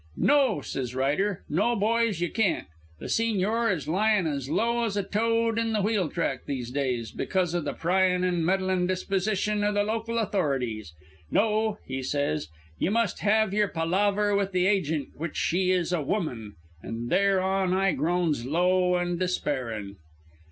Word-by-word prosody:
"'No,' 280 -6 +3
says 125 -2 -4
Ryder, 150 +9 0
'No, 205 +10 +1
boys. 225 -3 +1
Ye 175 - 0
can't. 220 -6 0 0.3
The - - -10
Sigñor 225 +1 +1
is 160 -6 -3
lying 205 +3 +2
as 140 -4 -3
low 235 +8 +1
as 210 -3 -1
a 200 - +1
toad 230 +3 +1
in 225 -1 0
a 210 - +1
wheeltrack 190 - -1
these 125 -4 -4
days, 125 -5 -2
because 180 -3 -1
o' 175 - 0
the - - -3
pryin' 180 +1 +1
and 175 -2 +1
meddlin' 185 0 +1
disposition 200 +3 0
o' 205 - +2
the 205 0 +1
local 225 +2 -2
authorities. 135 - -1 0.4
No,' 215 0 +1
he 130 0 -4
says, 130 - -1 0.3
'ye - - +1
must 225 -2 0
have 215 -1 +2
your 210 0 +2
palaver 200 +5 +1
with 200 -1 0
the 180 0 +2
agent 160 -8 0
which 160 0 -5
she 180 +2 +1
is 180 -1 +1
a 170 - +1
woman,' 125 - -3 0.3
an' 115 +1 -5
thereon 190 0 +2
I 190 +1 +2
groans 165 -6 0
low 180 +5 +2
and 175 -1 -1
despairin'. 125 - -2
185 Hz, 160 wpm, -27 LUFS, 155-210 Hz, 0.4 s, No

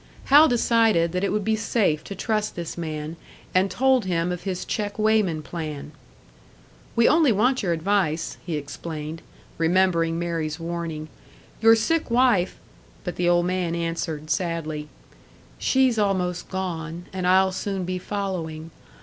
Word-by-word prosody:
Hal 295 +3 +7
decided 225 - +3
that 180 +2 -2
it 200 - +1
would 210 -1 -1
be 220 0 +2
safe 205 -8 +1
to 200 - -6
trust 215 +2 -1
this 170 -2 -5
man, 155 -1 -5 0.4
and 185 +2 +3
told 260 -2 +2
him 175 -1 0
of 180 -1 -4
his 185 -2 -3
check 205 -1 -3
weighman 215 -7 +2
plan. 150 -4 -6 1.0
"We 230 0 +5
only 305 -2 +5
want 245 +5 +2
your 185 -5 0
advice," 165 -1 0
he 170 - -3
explained, 155 +2 -6 0.4
remembering 165 -1 +2
Mary's 165 -2 -2
warning. 165 -2 -4 0.5
"Your 225 0 +7
sick 320 +8 0
wife 235 -7 +3 0.2
" - - -28
But 180 - -4
the 175 0 +1
old 175 0 +3
man 180 -2 -1
answered, 165 -2 -3
sadly, 155 -2 -2 0.7
"She's 260 -4 +3
almost 185 -4 0
gone, 175 -2 -4
and 185 -1 -2
I'll 190 +1 +4
soon 190 0 -3
be 185 0 -3
following. 175 -5 -4
180 Hz, 150 wpm, -24 LUFS, 165-210 Hz, 1.0 s, Hal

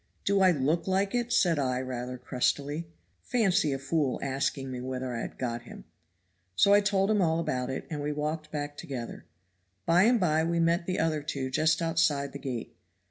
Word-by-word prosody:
'Do 200 0 +3
I 190 - +7
look 160 +2 +1
like 195 +1 +1
it?' 240 -1 -1
said 175 -9 +3
I 130 -2 0
rather 125 -1 -4
crustily. 140 +5 -1 0.3
Fancy 195 -9 +2
a 135 - -1
fool 140 -1 -1
asking 135 0 -2
me 125 -1 -5
whether 130 0 -4
I 115 - -3
had - - -6
got 120 -2 -3
him! 115 - -11 0.7
So 200 - +5
I 205 - +6
told 200 0 +2
him 210 -2 +3
all 165 -2 +2
about 125 -6 -2
it, 130 - -4
and 150 -2 -4
we 145 +1 -2
walked 155 +1 -3
back 145 -1 -4
together. 125 -4 -6 0.6
By 175 +4 +5
and 240 0 +4
by 160 -4 +2
we 170 +1 0
met 170 +1 +2
the 185 - -1
other 160 -2 +1
two 135 -3 -4
just 160 +5 +2
outside 160 -4 +1
the 140 - -6
gate. 125 -4 -5
150 Hz, 195 wpm, -29 LUFS, 130-170 Hz, 0.7 s, I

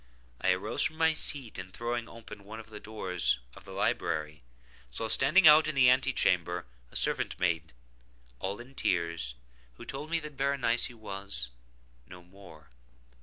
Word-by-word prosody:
I 95 - +1
arose 100 +5 -1
from 155 - +5
my 160 0 +3
seat, 135 -9 +2
and 95 0 -8
throwing 120 +3 -4
open 105 -3 -11
one 110 +3 -9
of 115 0 -12
the 105 - -8
doors 95 -8 -1 0.2
of - - -15
the - - -11
library, 75 -2 -2 0.5
saw 85 - -4
standing 155 - +5
out 155 +1 +8
in 155 - -2
the 125 -2 +6
ante 130 +1 +2
chamber 90 - 0 0.2
a - - -18
servant - - +2
maiden, 85 -3 0 0.7
all 100 +3 -4
in 125 +3 -12
tears, 85 - -1 0.4
who - - -11
told 145 +3 -6
me 165 0 +1
that 150 -2 -10
Berenice 135 -4 +1
was—no - - -8
more! 85 -6 -16
105 Hz, 160 wpm, -30 LUFS, 85-130 Hz, 0.7 s, out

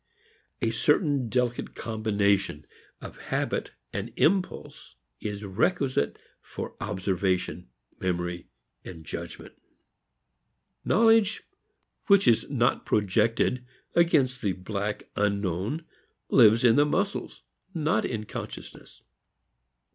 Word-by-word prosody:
A 115 - +2
certain 140 - +2
delicate 125 0 -1
combination 100 -8 0 0.4
of - - -10
habit - - -1 0.2
and 100 +4 -4
impulse 185 +2 0 0.2
is 105 -1 -5
requisite 115 - 0 0.2
for - - -7
observation, 95 - -1 0.3
memory 90 -1 -2 0.4
and 80 -3 -10
judgment. - - -7 1.3
Knowledge 225 -2 +4 0.6
which 200 -2 +5
is 115 -2 +3
not 125 -3 +1
projected 110 +4 +1 0.3
against 145 -7 +3
the 100 -4 0
black 100 +3 -4
unknown 100 - -1 0.4
lives 115 -2 +6
in 120 +1 +5
the 145 - +6
muscles, 195 +6 -2 0.3
not 155 -8 +1
in 110 -3 -3
consciousness. - - -9
110 Hz, 95 wpm, -27 LUFS, 100-140 Hz, 1.3 s, lives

